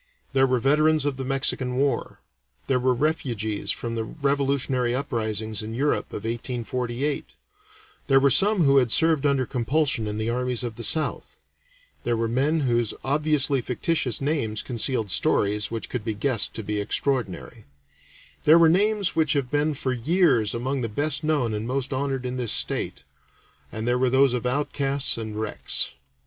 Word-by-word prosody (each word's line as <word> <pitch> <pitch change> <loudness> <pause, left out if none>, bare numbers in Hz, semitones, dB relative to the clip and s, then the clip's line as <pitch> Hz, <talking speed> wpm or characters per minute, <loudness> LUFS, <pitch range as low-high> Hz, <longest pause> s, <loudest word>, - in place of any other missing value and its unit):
There 135 0 +3
were 130 0 +1
veterans 150 +4 +2
of 140 -2 -1
the 135 - -4
Mexican 130 -1 0
War; 135 -2 -1 0.4
there 130 -2 +1
were 125 0 +1
refugees 120 -8 -2
from 115 -1 -2
the 115 -1 -2
revolutionary 140 -2 -1
uprisings 110 -5 -2
in 110 +1 -6
Europe 145 +4 0
of 105 - -8
1848; 120 +3 -3 0.7
there 135 -1 +5
were 140 0 +3
some 200 - +4
who 140 -1 +4
had 125 -4 +3
served 160 -1 +3
under 135 -2 +1
compulsion 130 -1 0
in 105 0 -4
the 110 +1 -2
armies 125 +1 0
of 120 -2 -5
the 115 - -7
South; 155 +6 0 0.6
there 120 -1 0
were 115 0 -1
men 140 +7 +1
whose 120 -4 0
obviously 145 -1 +2
fictitious 125 +1 -1
names 135 -7 -1
concealed 115 -3 0
stories 105 +2 +1
which 115 -1 -5
could 125 -4 -5
be 110 -1 -3
guessed 115 0 +1
to 110 - -5
be 105 0 -2
extraordinary; 115 -1 -2 0.8
there 155 +2 +7
were 165 -1 +6
names 200 +2 +1
which 155 -1 +2
have 140 -4 -2
been 150 +1 0
for 130 -1 -2
years 125 - +2
among 130 +3 -2
the 115 - -3
best 145 +6 0
known 145 -8 0
and 105 +2 -4
most 135 +1 -1
honored 135 -1 -2
in 125 0 -3
this 120 -4 0
state; - - +1 0.7
and 110 +2 -5
there 125 +1 +1
were 130 0 +2
those 135 0 +3
of 125 0 -2
outcasts 140 +1 0
and 110 -2 -6
wrecks. 110 - -1
130 Hz, 170 wpm, -24 LUFS, 115-145 Hz, 0.8 s, there